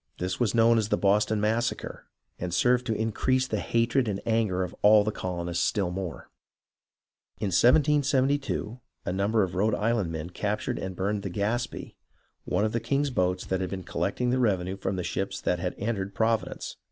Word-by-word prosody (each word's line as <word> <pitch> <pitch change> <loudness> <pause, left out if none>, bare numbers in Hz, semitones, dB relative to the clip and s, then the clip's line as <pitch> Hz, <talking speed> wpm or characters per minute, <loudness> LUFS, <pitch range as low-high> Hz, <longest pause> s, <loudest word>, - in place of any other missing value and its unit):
This 90 0 -3
was 120 -2 +1
known 115 0 +5
as 105 -1 -1
the - - +2
Boston 105 +2 +2
Massacre, 115 +3 -1 0.3
and 90 0 -3
served 125 +8 +2
to 110 - 0
increase 130 +4 +1
the - - -2
hatred 115 +2 +1
and 100 -2 -2
anger 110 -5 +1
of 90 - -6
all 105 0 +7
the 110 - -1
colonists 85 -3 -2
still 95 -4 0
more. 90 -2 -6 1.1
In 105 - -2
1772, 135 - +2 0.3
a 90 - -1
number 100 +3 +2
of 90 - -3
Rhode 105 +3 +1
Island 110 -5 0
men 80 +2 -5
captured 105 +3 -2
and 95 -1 -5
burned 100 +3 -1
the 100 - -4
Gaspee, 110 +6 -2 0.5
one 105 - +1
of 110 - 0
the 115 - 0
king's 140 +3 0
boats 90 -4 0
that 95 0 -1
had 95 - -2
been 95 -2 -5
collecting 125 +7 -1
the 130 - +1
revenue 95 -6 +1
from 95 0 -3
the 90 - -3
ships 95 +2 -3
that 90 - 0
had 90 +1 -3
entered 100 -2 -3
Providence. 115 0 -1
105 Hz, 185 wpm, -27 LUFS, 95-115 Hz, 1.1 s, all